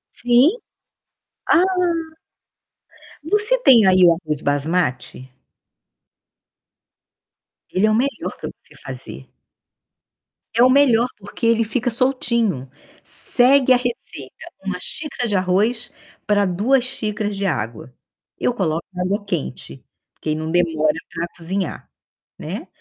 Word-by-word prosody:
Sim. 245 +5 +4 1.0
Ah 335 - +6 1.6
Você 425 +8 +2
tem 240 - +6
aí 185 -1 +5
o 175 - +8
arroz 155 -4 -4
basmati? 145 -3 -1 2.4
Ele 190 +3 +2
é 215 - +2
o - - +2
melhor 275 +4 -2
pra - - -5
você - - -21
fazer. - - -9 1.3
É 235 +2 +4
o 255 - +6
melhor, 255 -3 +4
porque 205 +3 -6
ele 230 0 +3
fica 240 +3 -1
soltinho. 235 - 0 0.3
Segue 260 +1 +3
a - - +5
receita: 245 -1 -7
1 - - -3
xícara 275 -6 -3
de 205 - -1
arroz, 205 +6 +1 0.4
pra 205 -1 +3
2 225 +9 +2
xícaras 210 -5 -3
de 195 0 -2
água. 120 - -3 0.5
Eu 245 - +1
coloco 170 -7 -2
na 180 - -3
água 200 +3 -1
quente, 65 - -5 0.4
que 155 - -4
aí 155 - +1
não 155 +1 -4
demora 160 -3 +2 0.2
pra 165 +1 -2
cozinhar, 180 +1 -3 0.5
né, - - -6
205 Hz, 120 wpm, -20 LUFS, 165-245 Hz, 2.4 s, o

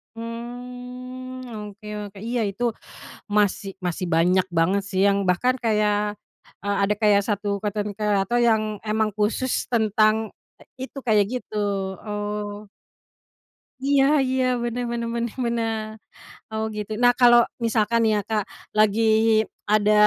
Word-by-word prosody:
Mmm, 250 +2 -7 0.2
oke 210 +1 -14 0.2
oke. 200 - -16
Iya, 235 +3 -2
itu 230 +5 -5 0.7
masih 205 -1 +1
masih 180 -1 -2
banyak 180 +3 +4
banget 175 +4 +2
sih 190 -1 -3
yang 200 0 +2
bahkan 190 +8 +2
kayak, 210 -3 0 0.4
eee, 205 0 0
ada 200 +1 +2
kayak 210 -2 +4
1 205 0 -2 0.2
konten 210 -1 -2
kreator 210 +2 +1
yang 220 -2 +4 0.2
emang 215 0 +1
khusus 220 +5 0 0.2
tentang 215 -2 +3 0.6
itu 265 +2 -7
kayak 210 -2 +4
gitu, 245 -4 -5 0.5
oh. 210 0 -4 1.1
Iya 275 +1 +3 0.2
iya, 260 0 +1 0.2
bener 240 +1 -2
bener 235 0 -2
bener 235 -1 -2
bener. 230 -1 0 0.7
Oh, 220 0 -2
gitu. 210 0 -5
Nah, 245 0 +7
kalau 240 -1 +8 0.2
misalkan 230 0 +2
nih 220 - +3
ya, - - +1
Kak, 215 -2 0 0.3
lagi 215 +1 +4 0.7
ada 210 0 +4
215 Hz, 130 wpm, -24 LUFS, 205-235 Hz, 1.1 s, kalau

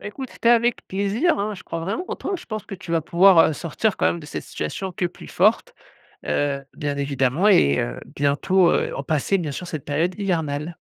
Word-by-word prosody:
Bah, - - -8
écoute, 260 +5 -7
c'était 230 - 0
avec 240 0 +3
plaisir, 200 - +1
hein, 210 +1 -2
je 185 - -11
crois 165 - -5
vraiment 200 - -3
en - - -3
toi! - - -4
Je - - -12
pense 215 -2 -5
que 195 - -6
tu 175 -2 -10
vas 165 -1 +2
pouvoir, 175 +3 +5
heu, - - -2
sortir 175 +7 -1
quand - - +2
même 170 - 0
de 150 - -11
cette - - -5
situation 190 -1 -4
que 180 - -3
plus 175 - -11
forte, 220 - +2 0.5
heu, 140 -1 -1
bien 145 -1 -2
évidemment. 140 +6 +1
Et, 70 - +5
heu, - - -3 0.2
bientôt 170 +6 +3
heu, - - +1 0.2
passer 160 +6 +1
bien 165 -5 -3
sûr 180 - -6
cette 155 -5 -6
période 160 +5 0
hivernale. 160 -4 -2
175 Hz, 220 wpm, -23 LUFS, 145-200 Hz, 0.5 s, pouvoir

